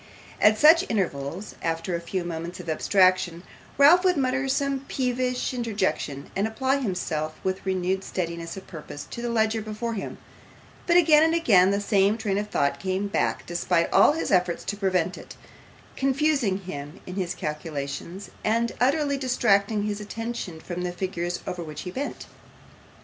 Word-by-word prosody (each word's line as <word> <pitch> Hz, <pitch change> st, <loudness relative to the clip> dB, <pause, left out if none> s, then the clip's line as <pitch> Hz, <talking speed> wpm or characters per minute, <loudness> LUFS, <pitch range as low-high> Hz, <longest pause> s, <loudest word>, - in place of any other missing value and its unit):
At 215 Hz, +1 st, +6 dB
such 320 Hz, +6 st, +7 dB
intervals, 175 Hz, -3 st, -2 dB
after 165 Hz, +2 st, -2 dB
a 170 Hz, -, -3 dB
few 180 Hz, +2 st, -3 dB
moments 170 Hz, +1 st, -5 dB
of 175 Hz, -, -9 dB
abstraction, 185 Hz, +1 st, +2 dB, 0.3 s
Ralph 310 Hz, +6 st, +7 dB
would 365 Hz, -2 st, +3 dB
mutter 265 Hz, 0 st, 0 dB
some 275 Hz, 0 st, 0 dB
peevish 250 Hz, 0 st, -1 dB
interjection, 200 Hz, -, -2 dB
and 200 Hz, +3 st, +1 dB
apply 260 Hz, +5 st, 0 dB
himself 165 Hz, -, -3 dB
with 190 Hz, 0 st, -2 dB
renewed 190 Hz, 0 st, 0 dB
steadiness 170 Hz, -1 st, -4 dB
of 190 Hz, -, -9 dB
purpose 150 Hz, -3 st, -8 dB
to 235 Hz, -, -5 dB
the 240 Hz, -, -2 dB
ledger 220 Hz, -1 st, +1 dB
before 215 Hz, +2 st, -4 dB
him, 205 Hz, -, -5 dB, 0.7 s
but 345 Hz, 0 st, +5 dB
again 310 Hz, -3 st, +6 dB
and 325 Hz, +1 st, +3 dB
again 195 Hz, -, +5 dB
the 200 Hz, 0 st, +1 dB
same 205 Hz, 0 st, +2 dB
train 205 Hz, -3 st, -1 dB
of 210 Hz, 0 st, -4 dB
thought 140 Hz, -6 st, 0 dB
came 190 Hz, +1 st, -2 dB
back -, -, -1 dB
despite 175 Hz, 0 st, 0 dB
all -, -, +6 dB
his 325 Hz, -, -2 dB
efforts 180 Hz, -2 st, +2 dB
to 205 Hz, -, -3 dB
prevent 185 Hz, -3 st, 0 dB
it, -, -, -11 dB, 0.6 s
confusing 270 Hz, -6 st, +1 dB
him 150 Hz, -4 st, -7 dB
in 180 Hz, -, -7 dB
his 180 Hz, -2 st, -2 dB
calculations, 150 Hz, +4 st, -5 dB
and 230 Hz, +2 st, +1 dB
utterly 280 Hz, +2 st, +2 dB
distracting 215 Hz, -5 st, +2 dB
his 210 Hz, 0 st, -3 dB
attention 225 Hz, -5 st, -5 dB
from 175 Hz, +2 st, -5 dB
the 180 Hz, 0 st, -2 dB
figures 175 Hz, -1 st, -3 dB
over 180 Hz, -1 st, -4 dB
which 155 Hz, -2 st, -7 dB
he 180 Hz, -, -6 dB
bent. 275 Hz, +9 st, -5 dB
195 Hz, 165 wpm, -25 LUFS, 175-240 Hz, 0.7 s, such